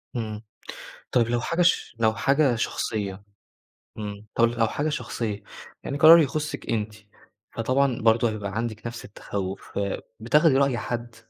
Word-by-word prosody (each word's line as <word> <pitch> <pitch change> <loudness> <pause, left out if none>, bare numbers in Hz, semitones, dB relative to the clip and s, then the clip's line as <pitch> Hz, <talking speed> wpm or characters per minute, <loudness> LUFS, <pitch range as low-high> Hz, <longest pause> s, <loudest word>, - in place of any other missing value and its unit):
إمم. 110 -2 -4 0.7
طَب 120 -2 +3
لو 120 0 0
حاجة 170 +7 -1
ش 175 -8 +2
لو 110 -1 +3
حاجة 135 +1 +2
شخصيّة؟ 105 -3 -3 0.7
إمم، 105 -1 -6
طَب 115 - +5
لو 115 -1 +1
حاجة 145 +7 -1
شخصية، 115 -8 -4 0.4
يعني 140 - -3
قرار 160 +3 +9
يخُصِّك 150 0 -2
أنتِ، 110 -1 -1 0.6
فطبعًا 130 +2 +1
برضه 115 +1 +4
هيبقى 105 -2 -5
عندِك 110 0 -3
نَفْس 115 0 -7
التَخُّوف، 100 -2 -6
فبتاخدي 120 - +1
رأي 135 -3 +2
حد؟ 120 0 -5
115 Hz, 140 wpm, -25 LUFS, 110-135 Hz, 0.7 s, قرار